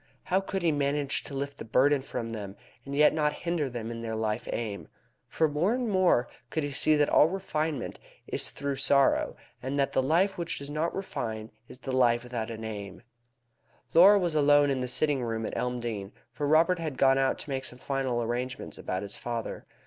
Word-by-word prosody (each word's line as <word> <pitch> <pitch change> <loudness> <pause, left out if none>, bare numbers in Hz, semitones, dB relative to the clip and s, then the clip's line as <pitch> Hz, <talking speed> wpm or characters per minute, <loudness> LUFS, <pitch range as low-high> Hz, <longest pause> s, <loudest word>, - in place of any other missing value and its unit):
How 190 +1 +1
could 195 -1 -3
he 165 - +3
manage 145 -1 0
to 140 - -7
lift 140 +1 -4
the - - -5
burden 135 +5 +3
from 115 -3 -5
them, 100 -3 -6 0.3
and 140 - -4
yet 150 +1 +5
not 150 -1 +1
hinder 170 -5 0
them 120 -2 -5
in 115 0 -6
their 110 -1 -3
life 110 0 -2
aim? 105 -4 -4 0.4
For 160 - +1
more 165 +10 +1
and 250 -1 -1
more 185 - +3 0.2
could 160 - -1
he 145 - -3
see 155 +3 +3
that 145 -1 +3
all 150 - +5
refinement 160 -6 -3 0.3
is - - 0
through 140 -1 -3
sorrow, 140 0 +3 0.3
and 135 +2 -3
that 140 -1 +1
the - - +3
life 175 +8 +2
which 170 -1 -2
does 140 +1 -6
not 155 +3 -1
refine 110 - -4 0.2
is - - -9
the 135 +1 -6
life 120 -2 +3
without 120 -2 -4
an 110 -1 -6
aim. 100 -2 -7 0.9
Laura 195 +5 +8
was 175 -4 0
alone 145 -1 +5
in 135 - 0
the 125 - -2
sitting 140 +1 +1
room 115 -2 -2
at - - -4
Elmdene, 120 -5 -3 0.2
for 145 +5 -3
Robert 165 +4 +4
had 155 -5 -4
gone 135 0 +4
out 135 0 +2
to - - -8
make 130 -1 -2
some 125 - -9
final 130 -3 -1
arrangements 125 +2 -4
about 95 +1 -3
his 100 0 -4
father. 120 -1 -5
135 Hz, 205 wpm, -28 LUFS, 120-155 Hz, 0.9 s, Laura